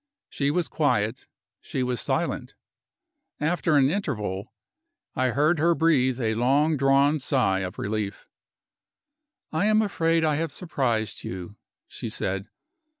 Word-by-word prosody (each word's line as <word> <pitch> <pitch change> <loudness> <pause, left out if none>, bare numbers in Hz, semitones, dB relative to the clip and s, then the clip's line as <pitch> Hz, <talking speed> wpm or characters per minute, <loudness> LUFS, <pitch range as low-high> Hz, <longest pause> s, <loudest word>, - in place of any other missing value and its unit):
She 140 -1 0
was 170 +3 0
quiet, 125 -6 0 0.3
she 130 - -3
was 125 -2 -1
silent. - - -2 0.8
After 160 0 +1
an 135 0 +4
interval, 105 - -3 0.6
I 130 - +2
heard 150 +6 +2
her 170 +2 +3
breathe 130 -6 +2
a 110 -3 0
long 140 +7 +2
drawn 140 +2 +3
sigh 120 -8 +1
of 95 -1 -5
relief. 105 -1 -3 1.2
"I 160 +6 +1
am 215 0 +4
afraid 165 -5 +1
I 150 -2 +2
have 165 -1 -2
surprised 130 - -2
you," 95 +2 -6 0.3
she - - -6
said. 95 +2 -3
135 Hz, 130 wpm, -25 LUFS, 110-160 Hz, 1.2 s, an